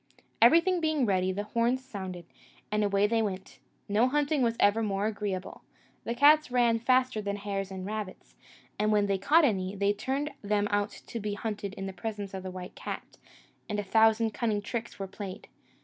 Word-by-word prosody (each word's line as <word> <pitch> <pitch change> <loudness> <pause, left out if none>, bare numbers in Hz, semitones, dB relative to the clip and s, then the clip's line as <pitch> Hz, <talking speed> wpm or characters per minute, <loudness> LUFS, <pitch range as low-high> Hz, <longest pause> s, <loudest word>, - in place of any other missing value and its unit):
Everything 335 +9 +5
being 310 -4 +1
ready, 190 -2 +1
the 200 +2 -3
horns 235 +4 0
sounded, 190 -8 -7 0.5
and 210 0 +1
away 200 0 +2
they 225 +2 +2
went: 195 -3 -4 0.3
no 215 +5 +3
hunting 290 +1 +1
was 230 -1 +1
ever 205 +2 +4
more 200 -2 -1
agreeable. 200 -3 -3 0.4
The 235 - -2
cats 300 +3 +6
ran 240 -2 +3
faster 255 -1 +2
than 200 -1 -2
the 205 - -9
hares 195 -1 -3
and 190 -1 -6
rabbits; 210 -2 -6 0.4
and 210 +1 +2
when 210 -1 +3
they 195 -1 0
caught 305 - +5
any, 190 -5 0
they 200 +1 +2
turned 275 +8 -2
them 205 0 +1
out 205 0 +1
to 230 - -8
be 210 -1 -3
hunted 205 -2 -4
in 195 - -5
the 195 - -5
presence 205 +1 -5
of 190 - -4
the 185 - -6
white 185 0 -8
cat, - - -7 0.5
and 210 -1 -1
a - - -1
thousand 220 +2 +3
cunning 215 -3 -1
tricks 235 +2 -5
were 195 - -4
played. 195 0 -8
210 Hz, 195 wpm, -29 LUFS, 195-235 Hz, 0.5 s, cats